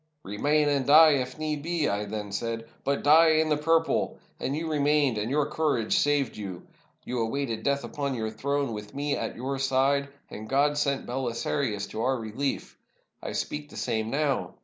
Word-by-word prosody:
'Remain, 145 Hz, +9 st, +1 dB
and 140 Hz, -3 st, +1 dB
die 155 Hz, +2 st, +8 dB
if 130 Hz, -3 st, -1 dB
need 155 Hz, -1 st, -2 dB
be,' 165 Hz, -1 st, 0 dB
I 100 Hz, +1 st, -1 dB
then 105 Hz, 0 st, -5 dB
said; 115 Hz, +2 st, -3 dB, 0.2 s
'but 140 Hz, 0 st, -1 dB
die 160 Hz, +2 st, +6 dB
in 155 Hz, 0 st, +2 dB
the 150 Hz, -, +3 dB
purple!' 165 Hz, +2 st, +1 dB, 0.2 s
And 135 Hz, -, -2 dB
you 165 Hz, +2 st, -3 dB
remained, 145 Hz, -5 st, +2 dB
and 105 Hz, +2 st, -2 dB
your 145 Hz, +2 st, +2 dB
courage 145 Hz, -9 st, 0 dB
saved 145 Hz, -3 st, +2 dB
you. 95 Hz, -4 st, -7 dB, 0.4 s
You 125 Hz, -, -3 dB
awaited 115 Hz, 0 st, -2 dB
death 140 Hz, +3 st, 0 dB
upon 140 Hz, -3 st, -3 dB
your 110 Hz, -2 st, -3 dB
throne, 140 Hz, +2 st, -1 dB
with 105 Hz, -1 st, -8 dB
me 145 Hz, +1 st, -1 dB
at -, -, -4 dB
your 135 Hz, +3 st, -3 dB
side 135 Hz, +1 st, +2 dB
— -, -, -40 dB
and 110 Hz, +1 st, -8 dB
God 145 Hz, +2 st, +2 dB
sent 140 Hz, -2 st, 0 dB
BeH 125 Hz, -1 st, -3 dB
sarius 110 Hz, -5 st, -1 dB
to 110 Hz, -, -4 dB
our 130 Hz, +2 st, +1 dB
relief! 115 Hz, +5 st, -4 dB, 0.4 s
I -, -, -5 dB
speak 150 Hz, 0 st, -4 dB
the -, -, -11 dB
same 110 Hz, -2 st, -1 dB
now. 140 Hz, 0 st, -1 dB
140 Hz, 195 wpm, -27 LUFS, 115-145 Hz, 0.4 s, die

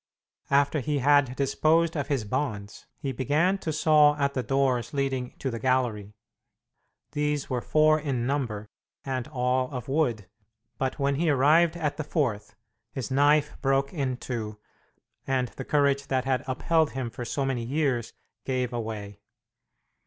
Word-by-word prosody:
After 140 Hz, +2 st, +3 dB
he 145 Hz, +2 st, -1 dB
had 140 Hz, -1 st, +3 dB
disposed 160 Hz, +5 st, +2 dB
of 145 Hz, -3 st, -2 dB
his 135 Hz, -6 st, 0 dB
bonds, 105 Hz, -4 st, -4 dB
he 140 Hz, -3 st, -3 dB
began 150 Hz, +10 st, +1 dB
to 160 Hz, -, -3 dB
saw 150 Hz, -1 st, +5 dB
at 140 Hz, -1 st, 0 dB
the 130 Hz, -, -1 dB
doors 135 Hz, -1 st, 0 dB
leading 135 Hz, -3 st, -2 dB
to 135 Hz, -, -3 dB
the 115 Hz, -, -4 dB
gallery. 115 Hz, -5 st, 0 dB, 1.0 s
These 150 Hz, -2 st, -1 dB
were 125 Hz, -1 st, 0 dB
four 155 Hz, +2 st, +3 dB
in 135 Hz, -6 st, -2 dB
number, 120 Hz, -7 st, -2 dB, 0.4 s
and 130 Hz, -2 st, -3 dB
all 130 Hz, -2 st, 0 dB
of 125 Hz, -4 st, -6 dB
wood, 130 Hz, -9 st, 0 dB, 0.5 s
but 130 Hz, -1 st, -1 dB
when 140 Hz, -1 st, 0 dB
he 165 Hz, +1 st, +1 dB
arrived 155 Hz, +5 st, +4 dB
at 150 Hz, -4 st, -2 dB
the 155 Hz, -, -2 dB
fourth, 125 Hz, -, -2 dB, 0.4 s
his 130 Hz, -4 st, -5 dB
knife 145 Hz, +2 st, +3 dB
broke 135 Hz, 0 st, +1 dB
in 135 Hz, -6 st, -2 dB
two, 110 Hz, -4 st, -5 dB, 0.7 s
and 130 Hz, -2 st, 0 dB
the 130 Hz, +6 st, -8 dB
courage 140 Hz, -1 st, +2 dB
that 130 Hz, -1 st, 0 dB
had 130 Hz, -1 st, 0 dB
upheld 160 Hz, +4 st, +1 dB
him 130 Hz, -3 st, -3 dB
for 125 Hz, -, -6 dB
so 135 Hz, +3 st, -2 dB
many 130 Hz, -3 st, -1 dB
years 130 Hz, -3 st, -1 dB, 0.3 s
gave 125 Hz, -2 st, -2 dB
away. 110 Hz, -3 st, -5 dB
135 Hz, 155 wpm, -27 LUFS, 125-145 Hz, 1.0 s, saw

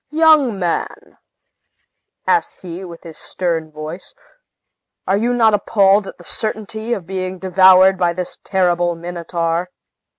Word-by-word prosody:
"Young 305 Hz, -7 st, +4 dB
man," 175 Hz, -3 st, -4 dB, 1.1 s
asked 435 Hz, -, 0 dB
he, 180 Hz, +1 st, -7 dB
with 170 Hz, -2 st, -11 dB
his 165 Hz, -2 st, -7 dB
stern 165 Hz, -3 st, -2 dB
voice, 155 Hz, -, -8 dB, 0.9 s
"are 190 Hz, -, +1 dB
you 230 Hz, +4 st, 0 dB
not 230 Hz, -3 st, +3 dB
appalled 200 Hz, -1 st, +3 dB
at -, -, -9 dB
the 175 Hz, -, -15 dB
certainty 220 Hz, +3 st, -3 dB
of 190 Hz, -7 st, -5 dB
being 185 Hz, 0 st, -4 dB
devoured 185 Hz, 0 st, +5 dB
by 175 Hz, -1 st, +2 dB
this 180 Hz, +1 st, -6 dB
terrible 175 Hz, -2 st, +1 dB
Minotaur?" 170 Hz, 0 st, -3 dB
185 Hz, 130 wpm, -18 LUFS, 175-205 Hz, 1.1 s, devoured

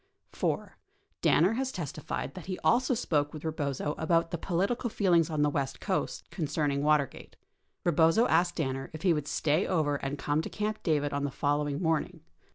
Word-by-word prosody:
4. -, -, -2 dB, 0.4 s
Danner 180 Hz, +7 st, +4 dB
has 260 Hz, +2 st, -1 dB
testified 150 Hz, -, -4 dB
that 180 Hz, -, -9 dB
he 185 Hz, -1 st, -3 dB
also 255 Hz, +1 st, +3 dB
spoke 150 Hz, -10 st, 0 dB
with 155 Hz, -, -9 dB
Eebozo 150 Hz, -2 st, -2 dB
about 165 Hz, +1 st, +2 dB
the 170 Hz, -, -1 dB
political 200 Hz, +9 st, 0 dB
feelings 175 Hz, -6 st, +3 dB
on 155 Hz, -2 st, +1 dB
the -, -, +4 dB
west 135 Hz, -2 st, -2 dB
coast 190 Hz, -3 st, -2 dB
concerning 145 Hz, -4 st, -1 dB
Watergate. 150 Hz, -2 st, 0 dB, 0.5 s
Ee -, -, +5 dB
bozo 165 Hz, +9 st, +4 dB
asked 175 Hz, +2 st, +2 dB
Danner 135 Hz, -4 st, -2 dB
if 155 Hz, -, -8 dB
he 180 Hz, -3 st, +4 dB
would 150 Hz, -2 st, -2 dB
stay 155 Hz, +5 st, +1 dB
over 150 Hz, -5 st, +1 dB
and 140 Hz, +1 st, -4 dB
come 145 Hz, +2 st, 0 dB
to -, -, -6 dB
Camp 215 Hz, 0 st, -3 dB
David 145 Hz, -4 st, 0 dB
on 140 Hz, 0 st, -1 dB
the 145 Hz, -, 0 dB
following 145 Hz, +1 st, 0 dB
morning. 160 Hz, +1 st, 0 dB
160 Hz, 180 wpm, -29 LUFS, 145-180 Hz, 0.5 s, Ee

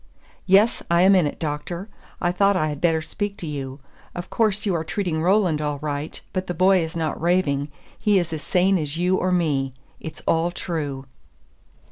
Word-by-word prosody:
"Yes, 200 Hz, +4 st, +4 dB
I 170 Hz, +1 st, +4 dB
am 195 Hz, +1 st, +6 dB
in 180 Hz, -5 st, +4 dB
it, -, -, -5 dB
Doctor. 165 Hz, +5 st, -4 dB, 0.3 s
I 175 Hz, -, +1 dB
thought 195 Hz, +2 st, +3 dB
I 155 Hz, -3 st, +1 dB
had 145 Hz, -1 st, -5 dB
better 160 Hz, -2 st, +2 dB
speak 205 Hz, +5 st, -4 dB
to 175 Hz, -, -7 dB
you. 140 Hz, -3 st, -5 dB, 0.4 s
Of 175 Hz, +1 st, -6 dB
course 210 Hz, -2 st, +1 dB
you 195 Hz, -, +1 dB
are 165 Hz, -2 st, -1 dB
treating 170 Hz, -2 st, -2 dB
Roland 180 Hz, -3 st, +2 dB
all 150 Hz, -1 st, -1 dB
right, 145 Hz, +1 st, -4 dB
but 185 Hz, 0 st, -2 dB
the 175 Hz, -, -3 dB
boy 185 Hz, +2 st, +5 dB
is 160 Hz, +1 st, -5 dB
not 160 Hz, -2 st, -2 dB
raving, 160 Hz, -5 st, +1 dB, 0.3 s
he 210 Hz, -2 st, +3 dB
is 175 Hz, -3 st, -1 dB
as 155 Hz, -, -4 dB
sane 185 Hz, +3 st, +2 dB
as 150 Hz, 0 st, -4 dB
you 180 Hz, +2 st, +2 dB
or 185 Hz, -, 0 dB
me. 140 Hz, -7 st, 0 dB, 0.2 s
It's 160 Hz, -, -8 dB
all 165 Hz, +1 st, +2 dB
true." 150 Hz, -6 st, -4 dB
170 Hz, 195 wpm, -23 LUFS, 150-185 Hz, 0.4 s, am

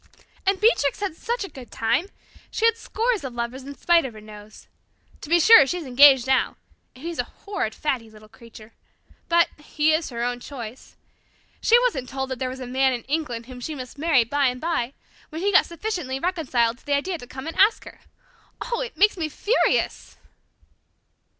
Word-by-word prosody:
And 390 Hz, -1 st, +2 dB
Beatrix 425 Hz, -, +2 dB
had 400 Hz, -5 st, -3 dB
such 475 Hz, +5 st, -3 dB
a -, -, -5 dB
good 255 Hz, -3 st, -12 dB
time! 245 Hz, +11 st, 0 dB, 0.4 s
She 445 Hz, -, -1 dB
had 455 Hz, -1 st, +4 dB
scores 455 Hz, -2 st, -1 dB
of 255 Hz, -3 st, -6 dB
lovers 240 Hz, +3 st, -4 dB
in 280 Hz, 0 st, -8 dB
spite 345 Hz, -1 st, +3 dB
of 250 Hz, -4 st, -6 dB
her -, -, -10 dB
nose. 210 Hz, 0 st, -13 dB, 0.6 s
To 300 Hz, -, -9 dB
be 345 Hz, +1 st, +5 dB
sure, 390 Hz, -5 st, +8 dB
she's 350 Hz, +1 st, -3 dB
engaged 265 Hz, 0 st, +6 dB
now 265 Hz, -1 st, +1 dB, 0.4 s
and 255 Hz, -, -14 dB
he's 340 Hz, 0 st, -5 dB
a -, -, 0 dB, 0.2 s
horrid, 390 Hz, -, -3 dB
faddy 255 Hz, -7 st, -2 dB
little 215 Hz, 0 st, -16 dB
creature. 225 Hz, -1 st, -15 dB, 0.6 s
But 340 Hz, 0 st, +4 dB
he 300 Hz, +1 st, +1 dB
is 315 Hz, +1 st, 0 dB
her 235 Hz, -2 st, -4 dB
own 245 Hz, 0 st, -2 dB
choice. 245 Hz, -2 st, -9 dB, 0.7 s
She 465 Hz, -, +5 dB
wasn't 270 Hz, -, -1 dB
told 265 Hz, 0 st, -4 dB
that 260 Hz, -, -4 dB
there 255 Hz, -, -2 dB
was 260 Hz, +1 st, -7 dB
a 255 Hz, -, -6 dB
man 260 Hz, +1 st, +1 dB
in 240 Hz, -2 st, -4 dB
England 275 Hz, -6 st, -3 dB
whom 250 Hz, 0 st, -10 dB
she 305 Hz, +5 st, -5 dB
must 255 Hz, +1 st, -9 dB
marry 305 Hz, -6 st, +4 dB
by 280 Hz, +4 st, +1 dB
and 250 Hz, 0 st, -2 dB
by, 310 Hz, -6 st, -2 dB, 0.4 s
when 320 Hz, +2 st, -6 dB
he 405 Hz, -, +2 dB
got 380 Hz, -, +5 dB
sufficiently 340 Hz, -8 st, -4 dB
reconciled 260 Hz, -9 st, 0 dB
to -, -, -26 dB
the 285 Hz, -, +2 dB
idea 345 Hz, +4 st, -2 dB
to 245 Hz, -, -11 dB
come 265 Hz, +1 st, -8 dB
and 325 Hz, -, -5 dB
ask 415 Hz, +4 st, +4 dB
her. -, -, -12 dB, 0.6 s
Oh, 480 Hz, -1 st, -3 dB
it 475 Hz, -8 st, -6 dB
makes 415 Hz, +3 st, +4 dB
me 320 Hz, -3 st, -2 dB
furious!" 425 Hz, +10 st, 0 dB
280 Hz, 200 wpm, -24 LUFS, 245-345 Hz, 0.7 s, sure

